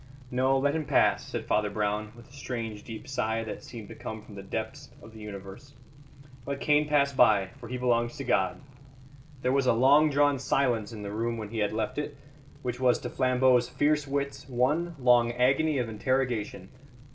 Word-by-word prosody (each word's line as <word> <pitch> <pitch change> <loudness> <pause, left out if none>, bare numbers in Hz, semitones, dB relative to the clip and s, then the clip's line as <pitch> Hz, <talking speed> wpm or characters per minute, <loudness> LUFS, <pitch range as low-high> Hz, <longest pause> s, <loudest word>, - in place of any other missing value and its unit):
"No; 130 +2 +2
let 140 +1 +1
him 160 -1 -2
pass," - - +3
said - - -5
Father 105 0 +1
Brown, 105 +1 -2
with 120 -1 -15
a - - -20
strange 115 -6 -5
deep 110 -2 -9
sigh 115 -4 -1
that 110 - -7
seemed 115 -4 -9
to - - -8
come 110 -1 -7
from 105 - -14
the 100 - -8
depths 110 +7 -5
of 110 - -14
the 110 - -11
universe. 105 +6 -10 0.7
"Let 140 0 -3
Cain 150 +1 +3
pass 140 -2 +2
by, 100 -7 +4
for 120 -2 -10
he 125 - -3
belongs 120 -1 0
to 140 - -4
God." 95 -7 +1 0.8
There 125 - +2
was 135 -1 +2
a - - +5
long 140 +6 +5
drawn 145 -1 +2
silence 120 -5 0
in 105 -2 -8
the 100 - -5
room 115 +2 -2
when 110 -2 -6
he 115 0 -4
had 105 - +1
left 110 +6 -2
it, 145 -1 -5 0.5
which 125 -1 -3
was 125 -1 +3
to - - -5
Flambeau's 130 -1 +3
fierce 145 +2 +1
wits 140 0 -3
one 150 +8 0
long 120 -2 +4
agony 135 +5 +2
of 125 -3 -1
interrogation. 110 -4 -2
125 Hz, 195 wpm, -28 LUFS, 110-140 Hz, 0.8 s, a